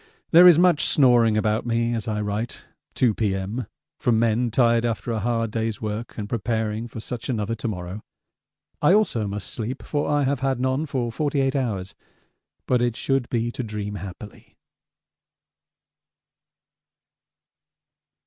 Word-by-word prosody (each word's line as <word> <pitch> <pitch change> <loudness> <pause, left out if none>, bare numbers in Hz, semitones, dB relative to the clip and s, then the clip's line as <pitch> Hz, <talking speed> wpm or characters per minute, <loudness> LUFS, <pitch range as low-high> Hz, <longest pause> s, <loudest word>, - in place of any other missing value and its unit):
There 175 +2 +9
is 175 -3 +8
much 175 -3 +4
snoring 120 -5 +4
about 110 0 +1
me 115 0 0
as 115 -2 -3
I 105 -1 -1
write 105 +3 -3 0.3
(2 120 -4 +3
P.M.) 100 +2 -2 0.3
from 120 -3 +2
men 115 +1 +2
tired 115 0 +3
after 115 0 -2
a 110 - -1
hard 115 0 -1
day's 110 -1 -2
work 110 +2 -5
and 105 -2 -4
preparing 110 0 -2
for 115 - -8
such 115 +3 -6
another 110 -2 -1
to 115 +1 -4
morrow. 90 0 -5 0.8
I 165 +6 +5
also 120 - +1
must 100 0 -5
sleep, 120 +3 -5
for 145 -1 -2
I 145 -1 +2
have 140 0 0
had 135 -1 0
none 130 +4 0
for 125 -4 -2
48 140 +1 0
hours 105 -8 -2 0.7
but 125 -1 +2
it 120 -2 0
should 135 -1 -1
be 120 0 -1
to 125 - -5
dream 105 -3 -5
happily. 100 +1 -10
115 Hz, 150 wpm, -24 LUFS, 105-130 Hz, 0.8 s, There